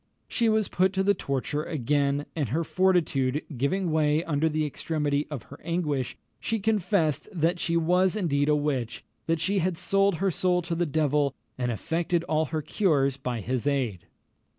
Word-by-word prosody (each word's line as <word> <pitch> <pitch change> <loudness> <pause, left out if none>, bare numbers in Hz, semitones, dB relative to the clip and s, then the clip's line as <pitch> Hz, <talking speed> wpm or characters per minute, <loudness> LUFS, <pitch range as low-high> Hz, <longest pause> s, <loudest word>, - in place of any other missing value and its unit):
She 230 -2 +1
was 215 -2 +2
put 185 +1 +1
to 190 0 +1
the 200 +1 +4
torture 140 -3 -2
again, 145 -1 0
and 145 -8 -1
her 160 +8 0
fortitude 160 -7 +1
giving 165 +8 0
way 155 0 +2
under 160 -1 +1
the 155 0 0
extremity 150 -1 -1
of 145 -7 -5
her 145 - -13
anguish, 150 -6 -1 0.2
she 225 - -1
confessed 195 -7 +1
that 175 -1 0
she 170 0 +1
was 180 +3 +3
indeed 150 -8 +1
a 150 - +5
witch 135 -6 -2 0.2
that 165 0 +1
she 195 +5 +1
had 180 -1 0
sold 195 +2 +2
her 195 +3 0
soul 180 +1 +1
to 170 - -3
the 170 0 0
devil, 145 -2 +1 0.2
and 125 -1 -1
effected 165 - -1
all 160 -1 +1
her 155 -1 -3
cures 140 -8 +1
by 125 -4 -3
his 125 +5 -2
aid. 125 -10 -1
155 Hz, 175 wpm, -27 LUFS, 140-180 Hz, 0.2 s, a